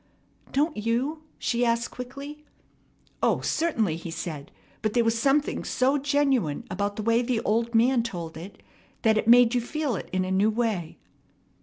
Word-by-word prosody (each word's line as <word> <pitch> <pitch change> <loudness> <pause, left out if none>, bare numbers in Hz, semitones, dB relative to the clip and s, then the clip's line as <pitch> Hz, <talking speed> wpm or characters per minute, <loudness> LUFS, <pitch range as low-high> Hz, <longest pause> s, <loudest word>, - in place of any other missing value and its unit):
"Don't 300 +3 +1
you?" 240 +8 -1 0.2
she 240 0 0
asked 235 0 +1
quickly. 275 +4 -8 0.8
"O, - - +2
certainly!" 230 - 0
he 170 0 -7
said, 155 -3 -6 0.3
"but 215 -1 -1
there 240 - +3
was 225 0 +2
something 275 +5 +1
so 270 +3 +1
genuine 275 - +1
about 200 +2 -2
the 215 - -4
way 230 +2 +3
the 245 -1 0
old 230 +1 0
man 240 +2 +4
told 175 -8 -5
it 180 +5 -10 0.4
that 220 -1 +4
it - - -3
made 240 0 +7
you 245 - +2
feel 285 0 -2
it - - -6
in 185 0 0
a 185 - -3
new 195 +3 +3
way." 215 -7 -2
230 Hz, 170 wpm, -26 LUFS, 205-265 Hz, 0.8 s, made